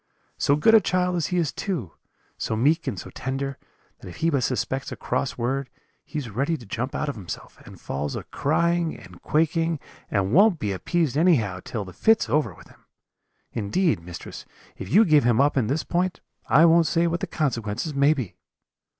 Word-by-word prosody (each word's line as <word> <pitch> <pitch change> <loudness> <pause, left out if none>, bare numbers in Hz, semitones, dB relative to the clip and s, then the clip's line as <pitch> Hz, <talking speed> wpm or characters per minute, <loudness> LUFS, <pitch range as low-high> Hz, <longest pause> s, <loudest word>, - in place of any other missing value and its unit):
So 140 - +3
good 150 +10 +4
a 220 - +8
child 180 0 0
as 170 - 0
he 180 - -1
is 165 -4 +1
too: 160 - -3 0.4
so 110 - -2
meek 145 +8 +2
and 120 -7 -2
so - - -8
tender, 135 +1 -4 0.4
that - - -11
if 90 - -9
he 165 +1 +1
but 140 -3 +1
suspects 130 +1 -2
a - - -4
cross 125 +1 -2
word, 130 +3 -2 0.3
he 155 - -7
is 130 -7 -4
ready 140 +9 0
to 120 - -13
jump 120 +6 -4
out 150 - -1
of 145 - -1
himself, 100 -8 -9
and - - -12
falls 70 +1 -4
a - - -4
crying 170 +2 0
and 90 -5 -14
quaking, 165 +1 +1 0.3
and 100 0 0
won't 200 0 +6
be 105 -9 -2
appeased 145 - -1
anyhow, 135 - +3
till 105 -4 -4
the 90 - -11
fit's 225 -1 +3
over 150 0 +1
with - - -16
him. - - -22 0.7
Indeed, 135 - +1
mistress, 85 +1 -9 0.3
if - - -8
you 220 +5 +6
give 155 -5 +5
him 120 0 +3
up 145 +2 +3
in 125 -6 +1
this 145 +6 0
point, 180 +1 -1 0.3
I 155 +4 +6
won't 165 -1 +5
say 165 +2 +2
what 170 0 0
the - - -3
consequences 125 -1 -2
may 140 +2 +4
be.' 125 - -4
145 Hz, 200 wpm, -24 LUFS, 115-165 Hz, 0.7 s, a